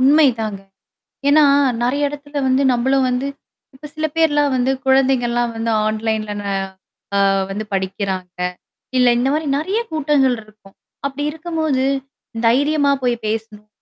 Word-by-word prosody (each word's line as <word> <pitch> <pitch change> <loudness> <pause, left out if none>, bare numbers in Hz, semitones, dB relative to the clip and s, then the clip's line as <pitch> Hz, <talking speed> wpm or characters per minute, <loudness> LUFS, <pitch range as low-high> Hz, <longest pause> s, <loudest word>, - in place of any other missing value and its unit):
உண்மைதாங்க. 255 -8 +3 0.7
ஏன்னா 300 +1 +6 0.4
நிறையா 285 +4 +1
எடத்துல 290 0 -8
வந்து 260 +1 +3
நம்பளும் 265 +2 +2
வந்து 250 +2 -1 0.5
இப்ப 300 +3 -10
சில 310 0 -1
பேர்லாம் 295 -3 +2
வந்து 255 +1 +1
குழந்தைங்கலாம் 250 -3 +2
வந்து 225 0 -1 0.2
online 220 0 -1 0.2
ந, - - -6 0.7
அ, - - +3 0.3
வந்து 210 +2 -4
படிக்குறாங்க 190 -1 -3 0.6
இல்ல, 250 -1 +5
இந்த 260 - +1
மாரி 310 +1 -1
நெறையா 380 +10 -1
கூட்டங்கள் 290 -4 +2
இருக்கும். 215 -2 -20 0.3
அப்டி 280 +1 -5
இருக்கும்போது, 315 -4 -1 0.6
தைரியமா 285 +4 +3
போய் 245 -1 +2
பேசணும். 215 -1 -4
260 Hz, 125 wpm, -19 LUFS, 225-290 Hz, 0.7 s, ஏன்னா